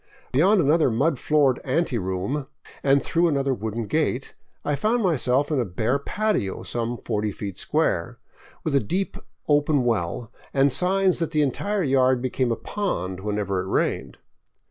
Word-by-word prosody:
Beyond 185 +10 +4
another 155 0 +3
mud 135 +4 +1
floored 145 -4 +2
anteroom 130 - -1 0.3
and 140 0 +3
through 170 +1 +2
another 140 -3 +1
wooden 110 -1 -4
gate, 140 0 -1 0.3
I 145 - 0
found 220 - +1
myself 140 -4 +2
in 145 - +1
a - - +2
bare 110 +7 -1
patio 205 - -1
some 120 0 -3
forty 105 -1 -2
feet 100 -1 -6
square, - - 0 0.5
with 155 - -1
a 140 - +5
deep 185 - -2 0.3
open 145 -2 +3
well 115 0 -1 0.2
and 135 0 +4
signs 185 +5 +3
that 165 - 0
the 155 -2 +2
entire 200 +8 -1
yard 130 -3 +3
became 130 0 -1
a - - +1
pond 95 - -3
whenever 100 -1 -2
it 95 - -6
rained. - - -1
135 Hz, 155 wpm, -24 LUFS, 115-155 Hz, 0.5 s, a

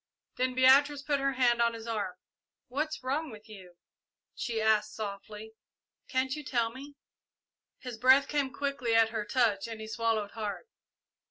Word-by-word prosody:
Then 255 0 0
Beatrice 275 +2 +5
put 285 -1 0
her 275 0 0
hand 240 -2 +3
on 235 0 +2
his 225 0 -9
arm. 210 -5 -3 0.5
"What's 305 +2 -3
wrong 285 +4 -1
with 215 -2 -12
you?" 185 -5 -13 0.6
she 235 -1 -3
asked 215 -1 +2
softly; 210 +1 -7 0.5
"can't 260 0 0
you 300 - -7
tell 235 -4 0
me?" 280 +4 -11 0.8
His 250 -4 -8
breath 265 +3 +6
came 285 -3 -1
quickly 275 -5 -1
at 225 -1 +5
her 220 -2 -3
touch 215 -3 +1
and 225 -1 -7
he 220 - -6
swallowed 220 -2 -1
hard. 215 - -5
235 Hz, 160 wpm, -30 LUFS, 220-270 Hz, 0.8 s, breath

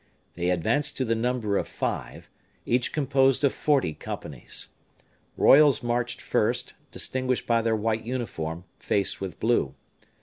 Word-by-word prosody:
They 90 +1 -1
advanced 140 - 0
to 130 - 0
the 115 - +1
number 115 -3 0
of - - -4
five, - - -4 0.4
each 120 0 +1
composed 135 -2 +2
of 140 - +3
forty 140 - +1
companies. 70 -3 -6 0.7
Royals 145 -2 +6
marched 120 0 -1
first, - - 0 0.2
distinguished 130 -1 -2
by 115 -1 +2
their 115 0 +1
white 110 +1 -1
uniform, 90 -9 -4 0.2
faced 100 -1 +1
with 95 -2 -6
blue. 110 - +1
120 Hz, 135 wpm, -26 LUFS, 100-130 Hz, 0.7 s, Royals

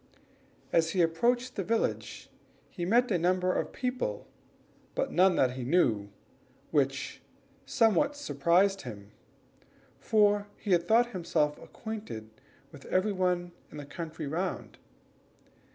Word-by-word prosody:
As 165 0 +3
he 180 -3 +3
approached 240 +10 +1
the 195 - -2
village 225 +4 -2 0.4
he 175 - -4
met 235 +5 +3
a 180 - +2
number 180 +1 +2
of - - -2
people, 255 - -3 0.7
but - - -1
none 185 0 +4
whom 130 - +3
he 130 0 -5
knew, 120 - +2 0.6
which - - 0 0.5
somewhat 280 +6 +3
surprised 195 -8 +2
him, 105 -5 -9 0.9
for 205 -1 +3
he 205 - -4
had 175 -1 +3
thought 235 +2 +4
himself 150 -6 0
acquainted 210 - -7 0.4
with - - -13
every 195 +3 +1
one 180 -2 0 0.2
in - - -11
the 145 - -7
country 160 +1 -6
round. 165 +7 -4
185 Hz, 125 wpm, -29 LUFS, 165-220 Hz, 0.9 s, none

